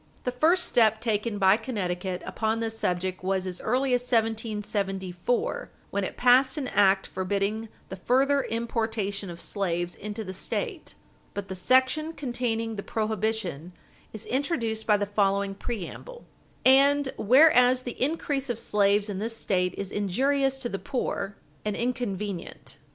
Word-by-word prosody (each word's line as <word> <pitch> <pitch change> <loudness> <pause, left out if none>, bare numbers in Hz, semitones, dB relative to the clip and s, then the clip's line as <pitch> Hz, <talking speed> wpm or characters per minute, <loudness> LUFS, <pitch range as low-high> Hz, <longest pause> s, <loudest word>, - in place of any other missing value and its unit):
The 250 - -1
first 315 +9 +3
step 220 -2 +3
taken 220 -1 -1
by 195 +1 +5
Connecticut 190 -6 -3
upon 220 0 -1
this 225 -1 -2
subject 185 -2 -2
was 190 0 0
as 180 -1 -5
early 255 +3 +1
as 245 - +3
1774, 215 -4 -1 0.2
wen 200 0 -1
it - - -5
passed 255 +2 +4
an 275 -4 -2
act 195 -1 +4
forbidding 200 +4 -2 0.2
the 190 - -5
further 270 +8 +2
importation 220 -4 -2
of 170 -1 -8
slaves 175 -3 -2
into 210 +2 -6
the 190 -2 -6
State. 370 - -4 0.4
But 200 -1 -5
the 190 - -4
section 260 - +2
containing 240 -5 -2
the - - -2
prohibition 215 -7 -2 0.4
is 215 0 -7
introduced 235 -5 -1
by 210 -1 +5
the 205 - -1
following 200 -1 +1
preamble: 240 - -7 0.4
"And 275 +1 +5
whereas 255 0 +5
the 245 - -7
increase 280 -2 -1
of 240 - -1
slaves 205 -2 +2
in 200 -2 -4
this 225 +2 -3
State 180 -4 0
is 200 -1 -4
injurious 270 +7 +1
to 240 - -3
the 195 - -4
poor, 200 -4 -3 0.3
and 210 -1 -2
inconvenient." 210 -7 -4
220 Hz, 145 wpm, -27 LUFS, 195-250 Hz, 0.4 s, by